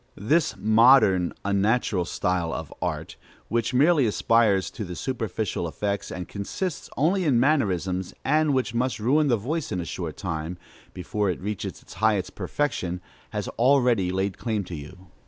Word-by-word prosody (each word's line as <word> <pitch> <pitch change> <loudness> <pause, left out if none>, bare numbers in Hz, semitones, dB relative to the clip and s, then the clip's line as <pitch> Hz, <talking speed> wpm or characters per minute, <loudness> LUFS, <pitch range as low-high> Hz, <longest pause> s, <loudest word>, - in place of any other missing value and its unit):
This 155 +10 +1
modern, 110 -3 +5
unnatural 100 -1 +1
style 90 -1 -1
of 80 -3 -6
art, - - -3 0.3
which 115 0 0
merely 145 0 +4
aspires 105 -2 +2
to 95 -6 -6
superficial 110 -7 -3
effects, 100 +6 -3
and 90 -2 -5
consists 140 - -4
only 180 +6 +2
in 135 -8 +3
mannerisms, 95 - +1
and 155 +2 +3
which 130 -3 0
must 125 +2 0
ruin 145 +7 +3
the 120 -4 +3
voice 145 +9 -3
in 90 - -1
a 85 - -3
short 80 -1 -5
time, 80 -1 -4 0.3
before 100 +2 -2
it 90 - -2
reaches 105 +1 -5
its - - -13
highest 105 +1 +1
perfection, 95 -12 -2 0.3
has - - -4
already 120 -7 +3
laid 95 +1 -2
claim 110 -4 -1
to 90 - -7
you. 90 +5 -11
105 Hz, 155 wpm, -25 LUFS, 90-130 Hz, 0.3 s, modern